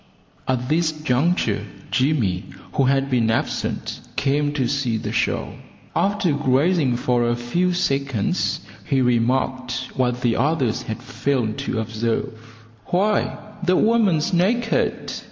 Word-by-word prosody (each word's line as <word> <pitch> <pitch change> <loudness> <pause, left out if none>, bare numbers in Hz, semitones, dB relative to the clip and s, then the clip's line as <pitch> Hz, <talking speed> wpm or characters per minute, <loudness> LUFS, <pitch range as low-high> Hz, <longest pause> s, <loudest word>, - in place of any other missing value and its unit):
At 125 -1 0
this 160 +2 +2
juncture 155 +2 +1 0.3
Jimmy, 120 -10 +1 0.3
who 135 - +2
had 135 +1 +2
been 120 -3 +2
absent, 115 - -2 0.2
came 145 +1 +1
to 135 -5 0
see 125 -4 0
the - - -4
show. - - -1 0.4
After 200 -3 +1
gazing 145 0 +2
for 120 0 +1
a 120 - +2
few 170 +10 0
seconds 140 - 0 0.2
he 135 +3 +1
remarked 125 +1 0
what 125 -1 0
the 120 -3 +1
others 135 -4 +1
had 110 - -6
failed 125 -2 -1
to 135 -4 -2
observe, 115 +3 -2 0.5
"Why, 205 +4 +1 0.3
the 180 +1 +3
woman's 205 -9 +3
naked!" 225 +7 +1
135 Hz, 125 wpm, -22 LUFS, 120-160 Hz, 0.5 s, the